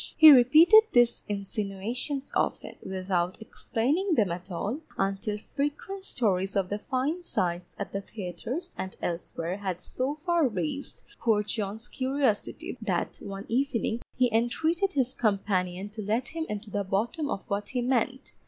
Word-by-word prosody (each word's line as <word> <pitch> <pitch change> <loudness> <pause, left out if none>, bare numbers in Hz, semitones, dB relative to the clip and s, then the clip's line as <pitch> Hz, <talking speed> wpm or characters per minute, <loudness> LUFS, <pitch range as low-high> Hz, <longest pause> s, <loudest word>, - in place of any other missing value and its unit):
He 315 -1 +11
repeated 310 - +8
these 240 -1 +4
insinuations 210 +7 -3
often, - - -1
without 185 -1 -1
explaining 290 - 0
them 205 - +2
at 180 +2 -6
all, 205 - -3 0.2
until 195 +2 -1
frequent 295 - -4
stories 195 - 0
of 195 -2 +1
the 205 - -2
fine 270 +10 -1
sights 175 - -2
at 200 - -5
the 195 - -3
theatres 225 - -5
and 190 - -5
elsewhere 170 +1 -3
had 190 -4 -3
so 260 +9 -2
far 335 -1 +2
raised 210 - -3 0.2
poor 215 -3 +2
John's 215 +2 -3
curiosity 260 -4 -1
that - - -1
one 195 +1 -7
evening 240 -2 0
he 250 -3 +2
entreated 320 - +1
his 260 -2 +1
companion 195 -3 0
to 215 +1 -6
let 220 +5 -1
him 325 0 -4
into 210 0 -5
the 205 0 0
bottom 235 - -1
of 195 - -4
what 200 +1 -1
he 250 -2 -1
meant. 255 +1 0
225 Hz, 150 wpm, -28 LUFS, 195-275 Hz, 0.2 s, He